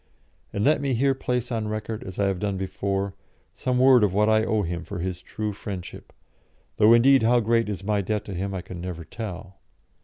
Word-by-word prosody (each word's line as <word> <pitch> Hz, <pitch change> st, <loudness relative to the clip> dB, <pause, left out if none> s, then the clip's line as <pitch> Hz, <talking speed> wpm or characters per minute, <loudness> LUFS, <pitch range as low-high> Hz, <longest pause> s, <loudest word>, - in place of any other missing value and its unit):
And 100 Hz, -, -1 dB
let 150 Hz, -, +3 dB
me 135 Hz, -3 st, 0 dB
here 135 Hz, +3 st, +3 dB
place 125 Hz, -2 st, -2 dB
on 110 Hz, -2 st, -1 dB
record, 110 Hz, +2 st, -4 dB
as 95 Hz, -1 st, -8 dB
I 100 Hz, -, +2 dB
have 95 Hz, -2 st, 0 dB
done 100 Hz, -1 st, -2 dB
before, 95 Hz, +1 st, -2 dB, 0.4 s
some 125 Hz, -1 st, -1 dB
word 130 Hz, -2 st, +6 dB
of 100 Hz, -2 st, +1 dB
what 105 Hz, +1 st, +3 dB
I 110 Hz, 0 st, +4 dB
owe 110 Hz, -2 st, +1 dB
him 85 Hz, -1 st, -4 dB
for 85 Hz, -, -7 dB
his 90 Hz, 0 st, -4 dB
true 105 Hz, -1 st, -4 dB
friendship; 95 Hz, -3 st, -8 dB, 0.7 s
though, 105 Hz, +2 st, +6 dB
indeed, 130 Hz, +3 st, +6 dB
how 120 Hz, +2 st, +4 dB
great 115 Hz, 0 st, +1 dB
is 95 Hz, -2 st, -4 dB
my 105 Hz, 0 st, +1 dB
debt 105 Hz, +2 st, -2 dB
to 100 Hz, -, -6 dB
him 95 Hz, +3 st, -3 dB
I 95 Hz, -2 st, -4 dB
can 90 Hz, -2 st, -8 dB
never 85 Hz, -2 st, -6 dB
tell. 95 Hz, -1 st, -7 dB
105 Hz, 215 wpm, -25 LUFS, 95-115 Hz, 0.7 s, word